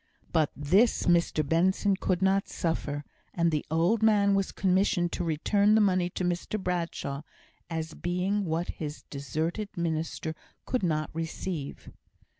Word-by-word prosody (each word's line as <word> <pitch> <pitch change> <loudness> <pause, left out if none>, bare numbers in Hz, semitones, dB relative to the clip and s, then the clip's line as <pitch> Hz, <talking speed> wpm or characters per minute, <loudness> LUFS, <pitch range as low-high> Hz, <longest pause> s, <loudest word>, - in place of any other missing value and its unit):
But 160 -3 +3
this 190 +11 +3
Mr 170 -4 +2
Benson 190 +5 +2
could 185 -1 0
not 195 +1 +2
suffer; 145 -3 -2 0.3
and 170 -1 +2
the 150 -2 0
old 170 +8 +2
man 205 -2 +4
was 195 -1 +1
commissioned 185 -2 +2
to - - -2
return 200 +6 +3
the - - +5
money 185 -4 +3
to 180 - -4
Mr 180 +4 -1
Bradshaw, 170 -6 -2 0.5
as 160 -1 -3
being 180 +4 -1
what 165 0 -2
his 150 -1 -5
deserted 160 +8 -3
minister 160 -1 -2 0.3
could 255 - -1
not 155 -4 0
receive. 165 -1 -5
175 Hz, 140 wpm, -28 LUFS, 160-195 Hz, 0.5 s, the